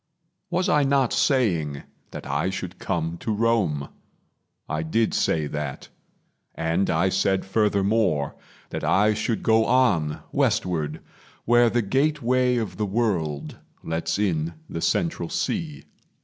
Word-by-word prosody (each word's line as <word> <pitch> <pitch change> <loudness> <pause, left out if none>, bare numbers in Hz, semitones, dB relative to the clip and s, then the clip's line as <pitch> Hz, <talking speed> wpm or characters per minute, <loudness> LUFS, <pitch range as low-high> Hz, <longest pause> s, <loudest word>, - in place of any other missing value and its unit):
Was 180 +2 0
I 150 -5 +4
not 135 -3 +2
saying 85 - +1 0.3
That - - -8
I 70 +6 0
should 95 -1 -6
come 85 -2 -2
to 110 - -3
Rome? 105 -10 +1 0.8
I 80 - -2
did 110 +8 0
say 80 -2 +1
that; 75 -2 -5 0.7
And 80 +4 0
I 85 +4 +2
said 95 0 +1
furthermore 100 -6 +1 0.4
that - - -4
I 105 +3 +3
should 110 +1 -2
go 110 0 +4
On 100 -13 +2
westward, 80 -3 0 0.4
where 120 0 +5
the 120 0 +1
gateway 130 0 +1
of 110 -3 -3
the 105 - 0
world 95 -9 -1 0.2
Lets 80 +3 -2
in 85 -5 -1
the 85 - -5
central 170 - 0
sea. 165 -7 -3
100 Hz, 130 wpm, -24 LUFS, 80-120 Hz, 0.8 s, where